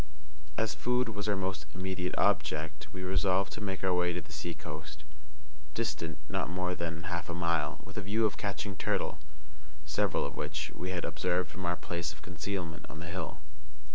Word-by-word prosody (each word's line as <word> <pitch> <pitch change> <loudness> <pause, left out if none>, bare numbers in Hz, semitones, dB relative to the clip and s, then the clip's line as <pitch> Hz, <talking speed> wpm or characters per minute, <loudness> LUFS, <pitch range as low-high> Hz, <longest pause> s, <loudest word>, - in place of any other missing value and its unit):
As 110 0 +3
food 125 0 +2
was 105 -1 -1
our 105 - +5
most 95 -5 -1
immediate 95 -1 -1
object, 75 0 +2
we 95 0 -4
resolved 95 +1 +3
to 110 - -4
make 95 -2 -2
our 95 -1 +5
way 90 0 +4
to 90 - -1
the - - -14
seacoast, 75 -1 -4 0.7
distant 85 -9 0
not - - 0
more 90 0 +1
than 85 -1 -2
half 85 0 -1
a 85 - -1
mile, 85 -2 +2
with - - -10
a - - +1
view 105 +3 +3
of 105 - +3
catching 100 -1 -1
turtle, - - +1 0.7
several 75 0 +2
of 70 - -3
which 75 +1 -1
we 90 +4 -3
had 90 -2 0
observed 90 0 +1
from 95 -1 -3
our 85 - +3
place 85 0 -1
of - - -15
concealment 90 -2 -3
on 75 - -7
the 85 - -5
hill. 90 -3 -3
90 Hz, 185 wpm, -33 LUFS, 85-95 Hz, 0.7 s, our